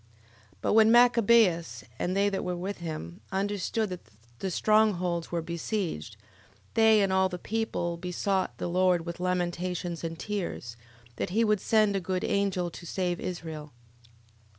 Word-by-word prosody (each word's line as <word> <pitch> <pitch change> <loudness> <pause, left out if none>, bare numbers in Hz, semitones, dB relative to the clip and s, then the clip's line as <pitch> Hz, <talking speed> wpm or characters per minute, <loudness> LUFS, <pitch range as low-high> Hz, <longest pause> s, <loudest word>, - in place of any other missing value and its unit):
11:6. 110 - -31 0.5
But - - +1
when 220 0 +6
Machabeus, 225 - +4 0.2
and 185 +2 -1
they 200 +1 +3
that 195 - -2
were 180 -1 -2
with 190 +3 -4
him, 155 - -6
understood 205 +2 -1
that 180 - -5 0.4
the 195 - -2
strong 215 +3 +3
holds 175 -2 -3
were 170 -1 -1
besieged, 170 - -3 0.6
they 220 -1 +5
and 190 -1 +1
all 190 0 +3
the 180 - -5
people 175 -4 -2
besought 185 +2 -1
the - - -3
Lord 180 -1 +2
with 170 0 -6
lamentations 180 -1 -2
and 165 0 -4
tears, 175 - -4 0.4
that - - -2
he 220 +6 +2
would 210 -3 +2
send 215 -2 +3
a - - +1
good 185 0 -2
angel 190 -3 0
to 175 - -10
save 180 0 -1
Israel. 160 -4 -6
185 Hz, 160 wpm, -28 LUFS, 170-205 Hz, 0.6 s, when